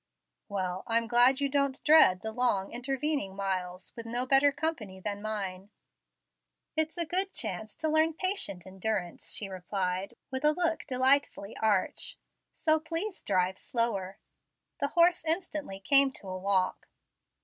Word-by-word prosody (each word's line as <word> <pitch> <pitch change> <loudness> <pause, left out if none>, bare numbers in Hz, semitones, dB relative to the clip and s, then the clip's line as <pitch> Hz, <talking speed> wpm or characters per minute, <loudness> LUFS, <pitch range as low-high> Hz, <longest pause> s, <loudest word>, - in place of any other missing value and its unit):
"Well, 185 -2 -2
I'm 230 0 +2
glad 245 +3 +5
you 280 - +1
don't 280 -1 0
dread 300 -12 +6
the 220 - -4
long, 220 -5 0
intervening 265 -3 -2
miles, 185 -2 -4
with 230 -1 -8
no 240 +2 -2
better 275 +2 +5
company 280 -10 -3
than 205 +1 -4
mine." 200 -3 -4 1.1
"It's 315 +2 -1
a 340 - +2
good 375 +4 -1
chance 210 +4 -3
to 315 - -1
learn 315 +1 +2
patient 370 - -1
endurance," 190 -1 -3
she 205 - -2
replied, 185 0 -3 0.2
with 260 +1 -4
a 300 0 +6
look 335 -2 0
delightfully 260 -5 +2
arch. 210 -4 0 0.4
"So 315 -1 +2
please 330 +5 -3
drive 185 -1 0
slower." 200 -6 -2 0.6
The 280 - +1
horse 345 +3 +3
instantly 315 - -3
came 275 +6 +5
to 200 - -10
a 185 - -4
walk. 190 -1 0
235 Hz, 145 wpm, -29 LUFS, 195-300 Hz, 1.1 s, dread